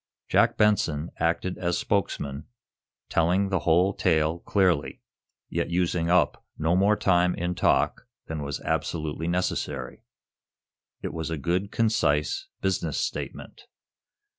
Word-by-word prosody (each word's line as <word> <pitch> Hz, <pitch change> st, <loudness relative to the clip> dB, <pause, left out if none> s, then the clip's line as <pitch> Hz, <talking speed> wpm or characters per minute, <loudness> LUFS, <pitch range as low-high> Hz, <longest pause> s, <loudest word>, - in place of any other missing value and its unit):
Jack -, -, +3 dB
Benson 85 Hz, -7 st, +2 dB
acted 85 Hz, +2 st, -1 dB
as 85 Hz, -1 st, 0 dB
spokesman, 75 Hz, -9 st, -2 dB, 0.6 s
telling 90 Hz, +4 st, +2 dB
the 95 Hz, -2 st, +1 dB
whole 85 Hz, +5 st, +3 dB
tale 80 Hz, -2 st, +1 dB
clearly, 90 Hz, -6 st, +1 dB, 0.5 s
yet 85 Hz, 0 st, -2 dB
using 85 Hz, -1 st, 0 dB
up 90 Hz, -4 st, +2 dB
no 80 Hz, +3 st, +1 dB
more 100 Hz, +3 st, +4 dB
time 90 Hz, -3 st, +2 dB
in 90 Hz, +1 st, -2 dB
talk -, -, +1 dB, 0.2 s
than 80 Hz, -1 st, -5 dB
was 70 Hz, 0 st, -4 dB
absolutely 80 Hz, 0 st, -2 dB
necessary. 80 Hz, -7 st, -2 dB, 1.0 s
It -, -, -4 dB
was 80 Hz, -1 st, -4 dB
a 80 Hz, -, -2 dB
good, 90 Hz, +7 st, -1 dB
concise, 115 Hz, -, +1 dB
business -, -, -1 dB
statement. -, -, -5 dB
85 Hz, 120 wpm, -26 LUFS, 80-95 Hz, 1.0 s, more